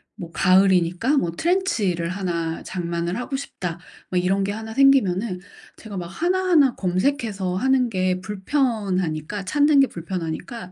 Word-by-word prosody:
뭐 175 -5 -8
'가을이니까 185 - +3
뭐 175 -10 +1
트렌치를 235 - 0
1 170 -4 -3
장만을 170 0 -3
하고 250 +3 -4
싶다.' 180 -10 -6 0.3
뭐 180 - 0
이런 195 +2 +1
게 200 - -2
1 220 +1 -7
생기면은 225 -8 +3 0.4
제가 205 -3 -8
막 175 -1 -4
하나하나 345 - +2
검색해서 195 -1 -1
하는 255 +3 +2
게 185 -2 0
불편하니까 195 - -1
찾는 290 +4 +4
게 270 - +4
불편하니까 180 +3 -6
195 Hz, 295 characters per minute, -23 LUFS, 180-255 Hz, 0.4 s, 찾는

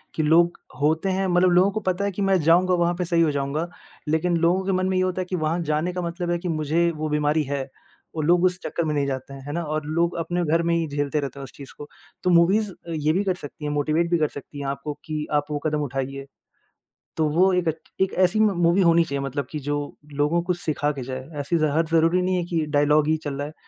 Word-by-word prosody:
कि 155 - 0
लोग 170 +3 +4 0.2
होते 160 +6 +2
हैं 195 0 0
मतलब 180 0 +4
लोगों 180 +3 +4
को 215 - -2
पता 185 +1 -1
है 200 - 0
कि 195 - -5
मैं 195 -1 +3
जाऊँगा 175 +4 +4
वहाँ 175 0 +2
पे, 180 - -2
सही 170 -1 +2
हो 160 -2 +3
जाऊँगा। 145 +3 -2 0.4
लेकिन 165 +3 +1
लोगों 175 +3 +2
के 195 - 0
मन 185 0 +1
में 185 - 0
ये 185 - +2
होता 185 0 -1
है - - -3
कि 185 - -1
वहाँ 165 +1 -1
जाने 155 +4 0
का 180 - -3
मतलब 175 0 -3
है 175 - +1
कि 180 - -5
मुझे, 160 +2 +1
वो 155 -1 -4
बीमारी 150 +1 +1
है 140 -1 -3 0.5
और 155 -2 -1
लोग 175 +2 +4
उस 180 0 +1
चक्कर 170 - -2
में 150 - -1
नहीं 145 -1 +1
जाते 130 0 -4
हैं, 135 - -9
है 145 - -5
ना? 170 +1 -2
और 155 -1 -3
लोग 170 +3 0
अपने 175 +1 -1
घर 165 +1 +2
में 170 0 +1
ही 165 -1 0
झेलते 145 +1 -1
रहते 140 -1 -5
हैं - - -6
उस 135 - -10
चीज़ 140 -2 -11
को, 145 - -9 0.4
तो 180 - +2
मूवीज़ 190 +5 +4 0.2
ये 155 -1 0
भी 195 +4 +1
कर 185 -2 0
सकती 150 -1 -9
है, 150 - -1
मोटिवेट 155 +3 +1
भी 170 - +4
कर 155 -2 +2
सकती 145 0 -10
है 140 - -4
आपको 140 +2 -4
कि 155 -1 -3
आप 145 0 +2
वो 145 - -1
कदम 150 -1 0
उठाइए। 135 0 -4 0.9
तो 155 - +2
वो 180 +5 +4
एक 180 -2 +1
अच 160 - +1 0.3
एक 190 - +2
ऐसी 180 +4 0
म 215 -1 +4
मूवी 170 +3 +4
होनी 170 -1 +5
चाहिए 140 -3 -3
मतलब 140 +1 -3
कि 150 - -4
जो 145 +1 -2 0.4
लोगों 155 +4 +2
को 180 +1 0
सिखा 150 -3 -1
के 140 -3 -6
जाए, 130 +1 -6
ऐसी 145 +4 0
ज़ 155 - +2
हर 165 +1 +2
ज़रूरी 165 +2 +3
नहीं 185 0 0
है 180 - 0
कि 165 -3 -1
डायलॉग 150 +1 +4
ही 160 0 +2
चल 145 - -3
रहा 145 +1 -3
है। 155 - -10
160 Hz, 270 wpm, -24 LUFS, 150-175 Hz, 0.9 s, होनी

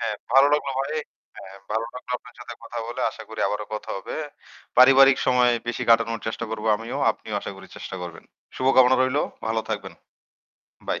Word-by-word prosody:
হ্যাঁ, 110 -2 -1 0.2
ভালো 135 +2 +7
লাগলো 150 -2 +1
ভাই। 140 +3 -2 0.4
হ্যাঁ, 95 0 -11
ভালো 110 +1 0
লাগলো 125 0 -7
আপনার 125 - -16
সাথে 120 - -8
কথা 120 - -7
বলে। 120 - -5
আশা - - -10
করি - - -7
আবারো 105 0 -3
কথা 105 - -6
হবে। 95 - -6 0.6
পারিবারিক 135 +1 +8
সময় 125 -1 +4 0.2
বেশি 120 - -2
কাটানোর 115 0 +3
চেষ্টা 110 +1 -3
করবো 110 -1 -4
আমিও। 115 +3 -5
আপনিও - - -7
আশা - - -6
করি - - -12
চেষ্টা 95 - -7
করবেন। 85 -1 -8 0.3
শুভকামনা 130 -1 +5
রইলো, 130 +3 +1 0.2
ভালো 110 0 0
থাকবেন। - - -4 1.0
বাই। - - -1
120 Hz, 180 wpm, -24 LUFS, 110-130 Hz, 1.0 s, পারিবারিক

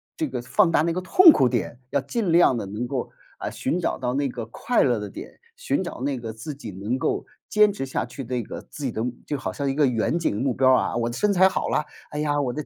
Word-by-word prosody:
这 315 - -1
个 125 - -4
放 145 +7 +2
大 155 - +4
那 170 +2 +1
个 185 - -1
痛 330 - +8
苦 130 - +3
点， 120 0 -2
要 140 - +1
尽 210 - -2
量 165 -7 +5
地 110 - -3
能 105 +5 -4
够， 130 -2 -3 0.3
啊， - - -4
寻 - - -2
找 - - -1
到 125 +1 -1
那 140 0 +1
个 120 -3 -5
快 240 - 0
乐 125 -3 +2
的 105 - -5
点， - - -10 0.2
寻 140 +7 -1
找 175 - -7
那 140 0 -1
个 115 -2 -6
自 115 +7 -7
己 125 -6 -8
能 100 +7 -3
够 - - -1 0.3
坚 210 -1 +5
持 165 -9 -4
下 130 - -2
去 130 +2 -7
的， 125 +1 -4
一 120 - 0
个 110 - -7
自 150 - -10
己 130 - -1
的 110 - -3 0.2
就 145 - -1
好 130 - -4
像 140 -1 -2
一 135 - -1
个 145 -1 +4
远 125 +5 +1
景 115 -10 -1
目 130 -2 0
标 130 0 +4
儿 - - +7 0.2
啊。 - - -4
我 115 0 0
的 120 - -4
身 205 +11 +2
材 190 -1 +6
好 190 - -2
啦， 150 - 0 0.2
哎 150 - -7
呀， 145 -1 +1
我 130 -3 -1
的 150 +3 -5
135 Hz, 305 characters per minute, -24 LUFS, 120-155 Hz, 0.3 s, 痛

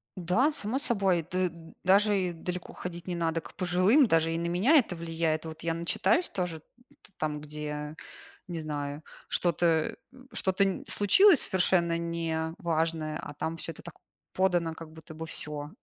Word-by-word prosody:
Да, 190 - +2
само 250 -2 -1
собой, 195 - +1
да, 185 -1 +1 0.3
даже 200 +2 +4
и - - -5
далеко 180 +2 -6
ходить 175 0 -7
не 180 - -2
надо 165 -1 0
к - - -13
пожилым, 185 +10 +4
даже 165 -3 +2
и 165 - -1
на 170 - -2
меня 190 - +3
это 225 -10 +2
влияет. 165 -1 -1
Вот 160 -1 -8
я 165 0 -1
начитаюсь 170 - +1
тоже 180 -4 -3
т 155 - -29 0.5
там, 150 -1 -2
где, 150 0 -6 0.5
не 175 -2 -5
знаю, 145 -1 -4 0.3
что-то, 175 0 +1
э, 160 -2 +1 0.3
у - - -18
что-то, 190 -2 +2
м, 195 -1 -2
случилось 290 - +6
совершенно 175 -2 +2
неважное, 165 -1 -2
а - - -7
там 160 +3 -3
всё 165 - -5
это - - -14
так 170 - -10 0.4
подано, 175 -3 +1
как 160 -1 -10
будто 160 0 -12
бы 160 +1 -6
всё, 150 -2 -5
170 Hz, 170 wpm, -29 LUFS, 160-185 Hz, 0.5 s, случилось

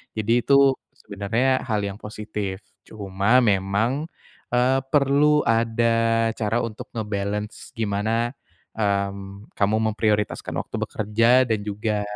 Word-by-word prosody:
Jadi, 115 +3 +1
tuh 140 -1 +5 0.2
sebenarnya 115 +7 -1
hal 105 -3 0
yang 100 0 -5
positif. 105 -2 -5 0.2
Cuma 100 +3 +1
memang, 110 - 0 0.4
eee, 125 +2 +2
perlu 145 +1 +3
ada 115 0 +2
cara 110 +1 -1
untuk 110 -2 -8
nge-balance 105 0 -4
gimana, 110 +3 -1 0.4
mmm, 100 -1 -3
kamu 100 +2 +1 0.2
memprioritaskan 105 -1 -1
waktu - - -5
bekerja 110 +2 0 0.2
dan 110 -3 0
juga 105 +1 -2
110 Hz, 110 wpm, -23 LUFS, 100-115 Hz, 0.4 s, tuh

